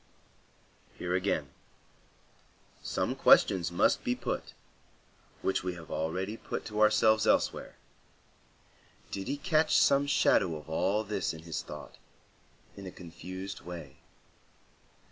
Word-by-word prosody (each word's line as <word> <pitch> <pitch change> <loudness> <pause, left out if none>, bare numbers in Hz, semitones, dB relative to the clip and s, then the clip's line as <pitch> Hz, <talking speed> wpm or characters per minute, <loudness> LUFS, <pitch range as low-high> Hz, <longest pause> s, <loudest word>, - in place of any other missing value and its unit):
Here, 90 0 -2
again, 90 -6 0 1.3
some - - -1
questions 85 -3 +5
must 85 - +2
be - - 0
put, - - -4 0.9
which 95 - 0
we 90 -1 -3
have 85 -2 -11
already 95 +7 -2
put - - -5
to 105 0 -2
ourselves 110 0 +4
elsewhere: - - +1 1.4
did 95 -1 -4
he 140 +2 -1
catch 155 +1 +3
some 140 +1 +4
shadow 95 - +3
of 75 - -9
all 95 +6 +1
this 100 -5 -2
in 80 - -11
his 80 -2 -4
thought, 75 0 -10 0.8
in 100 -1 -8
a - - -6
confused 95 +3 -8
way? 85 -6 -9
95 Hz, 120 wpm, -30 LUFS, 85-105 Hz, 1.4 s, questions